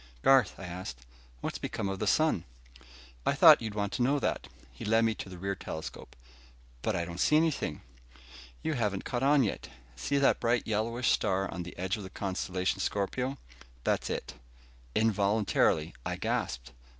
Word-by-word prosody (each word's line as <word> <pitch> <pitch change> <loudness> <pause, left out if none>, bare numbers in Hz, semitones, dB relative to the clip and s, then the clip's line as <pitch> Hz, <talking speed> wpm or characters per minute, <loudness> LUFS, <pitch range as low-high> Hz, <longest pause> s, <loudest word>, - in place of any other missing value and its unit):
"Garth," 135 -6 +5
I - - -9
asked, 85 -9 -7 0.4
"what's - - -3
become - - -3
of 95 0 -3
the 105 - -1
sun?" 155 - +3 0.8
"I - - +2
thought - - +8
you'd 110 -2 -4
want 100 -1 -1
to 110 - -2
know 135 +4 +3
that." - - -1 0.2
He - - -10
led 110 +2 +3
me 115 - +2
to 100 - -7
the 90 - -9
rear 100 +2 -2
telescope. 80 -4 -7 0.7
"But - - 0
I 85 - -1
don't 85 +1 -7
see 150 - +4
anything." 155 - 0 0.8
"You 160 - 0
haven't 105 -7 -1
caught 120 -2 -2
on 140 0 +5
yet. 105 - -3 0.3
See 105 - -1
that 140 - +4
bright 120 0 +1
yellowish 115 +3 0
star 95 +1 +1
on 90 - -4
the 90 +1 -8
edge 95 +3 -1
of 105 - -7
the 95 - -7
constellation 95 -1 -2
Scorpio. 125 +7 -1 0.5
That's - - 0
it." - - -4 0.6
Involuntarily, 100 -6 +2
I - - -2
gasped. 60 0 -2
100 Hz, 175 wpm, -30 LUFS, 95-120 Hz, 0.8 s, thought